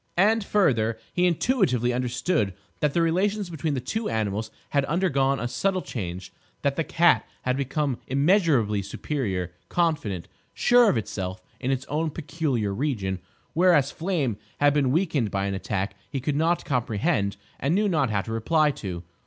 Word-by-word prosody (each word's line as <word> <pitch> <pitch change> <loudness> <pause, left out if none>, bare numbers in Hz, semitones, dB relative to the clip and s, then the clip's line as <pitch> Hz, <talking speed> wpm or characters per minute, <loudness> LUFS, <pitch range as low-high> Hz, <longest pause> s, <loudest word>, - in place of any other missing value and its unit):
And, 215 +4 +4
further, 115 - +2 0.2
he 180 0 +3
intuitively 155 - +2
understood 120 - 0 0.2
that 150 -2 +1
the 170 - +4
relations 190 +3 +1
between 160 -2 -2
the - - -1
two 220 - -3
animals 110 -1 -1 0.2
had 140 -1 +3
undergone 140 -5 +1
a 120 - -1
subtle 185 +10 0
change: 90 -5 -6 0.3
that 140 -1 +1
the 165 - 0
cat 170 +2 +4 0.2
had 125 0 +1
become 140 -1 -1
immeasurably 140 - +3
superior, 100 - -3 0.2
confident, 150 - 0 0.3
sure 245 -2 +5
of - - +2
itself 95 -3 -4 0.2
in 130 - -2
its 135 0 -1
own 155 +2 -1
peculiar 145 -9 -2
region, 100 -7 -1 0.3
whereas 165 -5 +4
Flame 160 - -1 0.2
had 145 0 +5
been 140 -3 +2
weakened 155 - +1
by 100 0 -1
an 100 - -1
attack 95 0 -2 0.2
he 135 - -3
could 140 +3 -1
not 165 +3 +1
comprehend 110 -5 0 0.2
and 145 +5 +1
knew 210 +1 +2
not 155 - +2
how 105 -2 +1
to 115 - -7
reply 150 +7 +2
to. 90 -9 -6
140 Hz, 160 wpm, -25 LUFS, 110-165 Hz, 0.3 s, sure